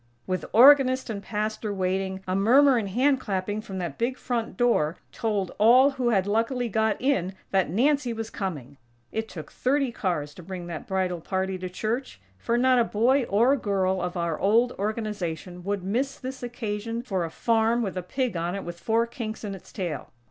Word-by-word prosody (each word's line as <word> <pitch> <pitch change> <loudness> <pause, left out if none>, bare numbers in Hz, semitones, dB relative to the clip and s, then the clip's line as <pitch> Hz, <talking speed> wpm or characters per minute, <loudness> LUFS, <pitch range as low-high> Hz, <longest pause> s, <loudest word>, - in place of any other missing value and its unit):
_ - - -38 0.2
With 185 0 -2
organist 260 0 +6
and 200 -2 -5
Pastor 215 +1 -3
waiting, 190 0 -2
a 185 - 0
murmur 260 +7 +5
and 210 -4 -1
hand 265 +6 +2
clapping 205 -1 -2
from 195 -3 -7
that 170 -6 -4
big 250 +3 0
front 235 -3 -3
door 210 -10 +2
told 210 -6 -1
all 250 +6 +6
who 255 -3 0
had 195 -5 +2
luckily 230 +4 0
got 220 0 +1
in 195 -9 0 0.2
that 190 -4 +2
Nancy 260 - +2
was 225 -1 -5
coming! 145 - -5 0.3
It 220 0 -3
took 155 -4 -9
thirty 275 0 +1
cars 170 -10 -2
to - - -11
bring 180 0 -7
that 170 -2 -7
bridal 185 -3 -1
party 190 +1 -2
to 185 0 -4
church; 220 - -3 0.2
for 235 - 0
not 255 0 +4
a - - +5
boy 240 +5 +2
or 235 +7 +3
girl 190 -6 0
of 180 +1 -3
our 170 -2 -1
old 230 +5 +3
Organization 195 -5 -3
would 200 -2 -2
miss 260 +8 -1
this 260 0 -7
occasion 230 -1 -4
for 195 -8 -1
a 165 - -3
farm, 230 +6 +1
with 195 -3 -3
a 185 - -2
pig 250 +4 -2
on 170 +2 -2
it 195 - -4
with 175 0 -7
four 230 +3 +1
kinks 230 -3 -6
in 205 -2 -4
its 195 - -11
tail. 175 -7 -4
210 Hz, 195 wpm, -26 LUFS, 185-240 Hz, 0.3 s, organist